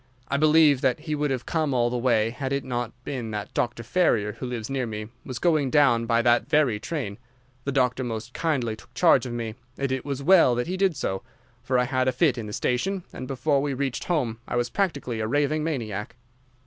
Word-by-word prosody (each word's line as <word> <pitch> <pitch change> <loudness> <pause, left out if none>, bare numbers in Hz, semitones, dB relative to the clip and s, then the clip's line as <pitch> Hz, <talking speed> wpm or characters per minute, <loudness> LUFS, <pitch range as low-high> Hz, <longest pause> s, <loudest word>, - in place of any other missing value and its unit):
I 140 - +1
believe 155 -2 +5
that 130 +2 +1
he 155 -1 -3
would 150 0 0
have 130 -2 -2
come 155 -5 0
all 120 -1 +2
the - - -2
way 115 -3 +2
had 135 +2 -4
it 140 0 0
not 120 -2 -3
been 125 -5 -4
that 105 -1 -5
Dr. 120 -1 -1
Ferrier, 115 - +2
who 125 - -6
lives 115 -3 -4
near 135 -3 -2
me, 105 -1 -5
was 130 - -6
going 155 -1 +2
down 125 -5 +4
by 115 0 +2
that 120 +3 +3
very 145 -9 +3
train. 120 -8 -4 0.5
The 140 - -1
doctor 130 -1 +1
most 115 0 -5
kindly 130 -9 -1
took - - -18
charge 165 -6 +4
of 120 - -5
me, 115 -2 -3 0.2
and 135 -1 -1
it 130 -1 -1
was 140 -1 -4
well 165 -7 +6
he 165 +10 -1
did 190 -4 +1
so, 95 0 -2 0.4
for 130 0 0
I 125 - +3
had 130 0 0
a - - +4
fit 130 -1 +2
in 110 - -5
the - - -6
station, 180 - -1
and 130 - -6
before 140 +1 +1
we 140 -1 -1
reached 135 -1 -2
home 125 -10 -1
I - - -3
was 120 0 0
practically 140 - -1
a 110 - -1
raving 145 +4 +1
maniac. 115 -8 -3
130 Hz, 225 wpm, -25 LUFS, 120-145 Hz, 0.5 s, well